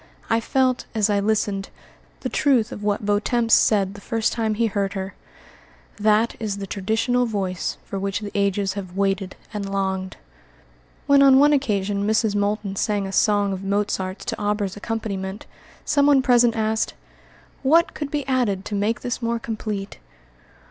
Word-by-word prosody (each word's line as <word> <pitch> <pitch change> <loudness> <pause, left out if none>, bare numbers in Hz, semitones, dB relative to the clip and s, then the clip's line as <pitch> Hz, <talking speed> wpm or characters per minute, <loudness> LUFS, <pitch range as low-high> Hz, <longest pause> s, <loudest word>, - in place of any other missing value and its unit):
I 225 - +4
felt, 255 +1 +1
as 215 -1 +2
I 200 - +2
listened, 205 -1 0 0.5
the - - -2
truth 255 -7 +2
of - - -7
what 205 -1 0
Vieuxtemps 225 +3 +1
said 200 -3 +4
the 205 - -11
first 225 +1 -1
time 220 -2 -1
he 230 +2 +1
heard 200 -2 -1
her, 190 -1 -5 0.8
"That 215 +2 +2
is 210 -3 -3
the 200 - -5
traditional 225 +6 0
voice 190 -5 -2
for 195 - -5
which 195 0 -2
the 205 -1 -6
ages 200 -1 0
have 190 -2 -7
waited 195 -1 0 0.2
and 200 -2 -4
longed." 190 -1 -2 0.9
When, 280 0 +5
on 270 -1 +7
one 290 +2 +6
occasion, 205 -7 0
Mrs. 220 -1 +2
Moulton 205 -1 -1
sang 205 -1 0
a 195 - -5
song 205 0 +2
of 190 0 -6
Mozart's 195 -1 -2
to - - -4
Auber's 205 -2 -1
accompaniment, 205 -2 -4 0.4
someone 285 -2 +4
present 240 -3 +4
asked, 220 0 0 0.7
"What 325 +5 +4
could 295 -2 -4
be 290 -1 -2
added 225 -7 0
to - - -6
make 205 +3 0
this 245 0 -3
more 235 0 0
complete?" 215 -3 -5
210 Hz, 160 wpm, -23 LUFS, 195-230 Hz, 0.9 s, on